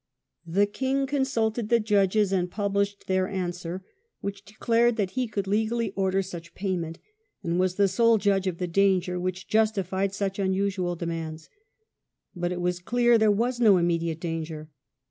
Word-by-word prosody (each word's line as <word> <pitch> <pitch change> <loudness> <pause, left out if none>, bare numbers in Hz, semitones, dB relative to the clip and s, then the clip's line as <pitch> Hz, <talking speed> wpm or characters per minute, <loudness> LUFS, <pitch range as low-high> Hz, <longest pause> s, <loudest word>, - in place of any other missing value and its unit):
"*^®°^ - - -8
The 200 +1 +5
king 265 +6 -1
consulted 240 -6 -1
the 235 -1 +4
judges 205 -1 +2
and 180 -2 0
published 200 0 -1
theiF 185 0 +1
answer, 180 -1 -4 0.3
which 200 0 -5
declared 230 +3 +1
that 200 -5 -1
he 255 +3 -1
could 205 -3 -3
legally 220 +2 0
order 195 -1 0
such 170 -2 -9
payment, 175 -4 -3 0.5
and 170 +1 0
"was 185 -1 +1
the 200 0 +4
sole 230 +4 +4
judge 195 -1 +1
of 180 -2 -2
the 180 - -2
danger" 180 0 +2
which 185 0 -4
justified 200 -3 +1
such 195 -1 -2
unusual 190 -2 0
demands. 165 -2 -5 0.9
But 175 0 -2
it 180 0 -3
was 180 0 -1
clear 240 +4 +3
there 220 -1 +4
was 240 +4 +1
no 210 -5 +6
immediate 170 -2 0
danger. 160 -2 -5
195 Hz, 165 wpm, -26 LUFS, 180-215 Hz, 0.9 s, no